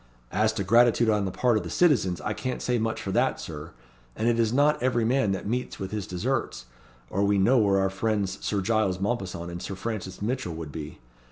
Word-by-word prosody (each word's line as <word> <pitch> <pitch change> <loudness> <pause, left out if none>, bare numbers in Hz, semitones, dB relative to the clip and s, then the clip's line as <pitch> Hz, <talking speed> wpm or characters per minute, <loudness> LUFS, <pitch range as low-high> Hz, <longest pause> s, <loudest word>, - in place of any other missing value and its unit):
"As 110 +3 +2
to 105 -3 -2
gratitude 115 +2 +4
on 105 -2 +1
the 95 - -2
part 120 +3 +2
of - - -2
the - - -6
citizens, 110 - +2
I - - -2
can't 130 -1 -4
say 125 -1 +1
much 110 0 -1
for - - -4
that, - - +1
Sir. 75 0 -7 0.5
And 110 - -1
it 120 -1 +2
is 115 -1 +2
not 145 +3 +3
every 120 -2 +1
man 125 -3 +2
that 95 - -4
meets 125 +4 -2
with 95 -1 -5
his 105 -2 -4
desserts, 110 - -2 0.5
or 100 - +1
we 100 0 +3
know 120 +7 +4
where 100 -2 +3
our 95 0 +1
friends 100 -1 -1
Sir 100 -2 0
Giles 100 -2 +1
Mompesson 95 -5 -3
and 85 0 -6
Sir 100 - -5
Francis 95 -2 -5
Mitchell 110 -5 -2
would 80 -2 -6
be. 75 0 -7
105 Hz, 225 wpm, -26 LUFS, 95-120 Hz, 0.5 s, gratitude